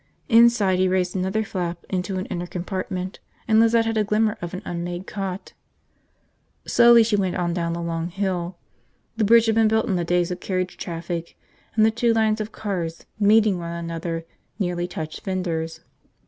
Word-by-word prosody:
Inside, 230 Hz, -5 st, +5 dB
he 185 Hz, -, +3 dB
raised 185 Hz, 0 st, 0 dB
another 190 Hz, +4 st, 0 dB
flap 175 Hz, -4 st, -4 dB
into 185 Hz, +1 st, -2 dB
an 185 Hz, -, -3 dB
inner 175 Hz, 0 st, -4 dB
compartment, 185 Hz, +1 st, -4 dB, 0.3 s
and 220 Hz, 0 st, +5 dB
Lizette 230 Hz, 0 st, +4 dB
had 225 Hz, 0 st, -1 dB
a -, -, +3 dB
glimpse 215 Hz, +1 st, 0 dB
of 175 Hz, -1 st, -5 dB
an 185 Hz, -, -7 dB
unmade 175 Hz, +1 st, -4 dB
cot. 195 Hz, -1 st, -5 dB, 1.1 s
Slowly 235 Hz, -1 st, +6 dB
she 220 Hz, -1 st, +1 dB
went 190 Hz, -3 st, 0 dB
on 175 Hz, -1 st, -1 dB
down 170 Hz, -1 st, -1 dB
the 170 Hz, 0 st, -4 dB
long 165 Hz, 0 st, -2 dB
hill. 180 Hz, -2 st, -2 dB, 0.6 s
The 220 Hz, -, +2 dB
bridge 230 Hz, +2 st, +6 dB
had 225 Hz, -, +2 dB
been 225 Hz, 0 st, +4 dB
built 220 Hz, 0 st, +2 dB
in 190 Hz, -, 0 dB
the 175 Hz, -, 0 dB
days 175 Hz, +1 st, +1 dB
of 180 Hz, -, -4 dB
carriage 185 Hz, -1 st, -2 dB
traffic 170 Hz, 0 st, -5 dB, 0.4 s
and 215 Hz, -1 st, +5 dB
the 220 Hz, -, +4 dB
two 235 Hz, +1 st, +2 dB
lines 220 Hz, -1 st, +2 dB
of 215 Hz, +1 st, -5 dB
cars 175 Hz, -6 st, -4 dB
meeting 210 Hz, -2 st, +4 dB
one 170 Hz, 0 st, -5 dB
another 165 Hz, 0 st, -4 dB, 0.3 s
nearly 175 Hz, -3 st, -1 dB
touched 160 Hz, -3 st, -6 dB
fenders. 165 Hz, -4 st, -3 dB
185 Hz, 180 wpm, -23 LUFS, 175-215 Hz, 1.1 s, Slowly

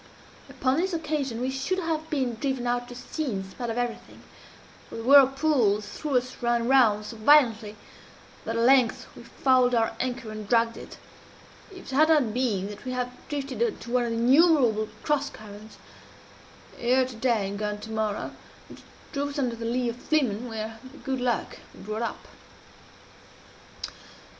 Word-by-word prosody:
Upon 260 Hz, +1 st, 0 dB
this 365 Hz, +2 st, 0 dB
occasion 295 Hz, -7 st, -2 dB
we 255 Hz, +2 st, -1 dB
should 270 Hz, +8 st, -2 dB
have 320 Hz, -3 st, -2 dB
been 265 Hz, -6 st, -1 dB
driven 260 Hz, +1 st, -2 dB
out 245 Hz, 0 st, -1 dB
to 245 Hz, -, -10 dB
sea 310 Hz, +5 st, -5 dB
in 195 Hz, -1 st, -3 dB
spite 240 Hz, +5 st, -6 dB
of 225 Hz, -, -3 dB
everything 245 Hz, -1 st, -4 dB, 0.7 s
(for -, -, -9 dB
the 225 Hz, -, -5 dB
whirlpools 270 Hz, -5 st, +4 dB
threw 290 Hz, -4 st, -1 dB
us 255 Hz, +1 st, -3 dB
round 235 Hz, 0 st, +1 dB
and 235 Hz, -, -2 dB
round 215 Hz, -6 st, +4 dB
so 225 Hz, +2 st, -8 dB
violently, 225 Hz, -4 st, +4 dB, 0.7 s
that, 225 Hz, -, -3 dB
at 230 Hz, -, +1 dB
length, 255 Hz, -2 st, +4 dB
we -, -, -11 dB
fouled 255 Hz, -2 st, +2 dB
our 225 Hz, -1 st, +1 dB
anchor 245 Hz, -3 st, -3 dB
and 215 Hz, -1 st, -8 dB
dragged 230 Hz, -1 st, +3 dB
it) -, -, -10 dB, 0.7 s
if 375 Hz, -8 st, -10 dB
it -, -, -1 dB
had 310 Hz, +3 st, +5 dB
not 285 Hz, -9 st, +3 dB
been 220 Hz, -6 st, 0 dB
that 205 Hz, 0 st, -10 dB
we 255 Hz, -1 st, -4 dB, 0.3 s
drifted 275 Hz, -, -4 dB
into 430 Hz, -, -2 dB
one 250 Hz, -1 st, +2 dB
of -, -, -2 dB
the 230 Hz, -, -2 dB
innumerable 250 Hz, -4 st, +4 dB
cross 290 Hz, -1 st, 0 dB
currents 210 Hz, 0 st, -12 dB, 1.0 s
here 255 Hz, +2 st, +3 dB
to 255 Hz, -1 st, -8 dB
day 225 Hz, -4 st, +1 dB
and 200 Hz, +1 st, -5 dB
gone 210 Hz, -1 st, -2 dB
to 220 Hz, -, -8 dB
morrow 215 Hz, -2 st, -2 dB, 0.4 s
which -, -, -12 dB, 0.3 s
drove 285 Hz, 0 st, -2 dB
us 285 Hz, -, -7 dB
under 250 Hz, -4 st, 0 dB
the 230 Hz, 0 st, -6 dB
lee 245 Hz, +1 st, 0 dB
of 235 Hz, 0 st, -3 dB
Flimen, 250 Hz, -5 st, 0 dB
where, 220 Hz, 0 st, -5 dB
by 260 Hz, 0 st, -13 dB
good 265 Hz, -2 st, -2 dB
luck, 245 Hz, -2 st, -1 dB, 0.2 s
we -, -, -15 dB
brought 215 Hz, +2 st, -4 dB
up. 235 Hz, -, -4 dB
245 Hz, 175 wpm, -26 LUFS, 225-270 Hz, 1.0 s, had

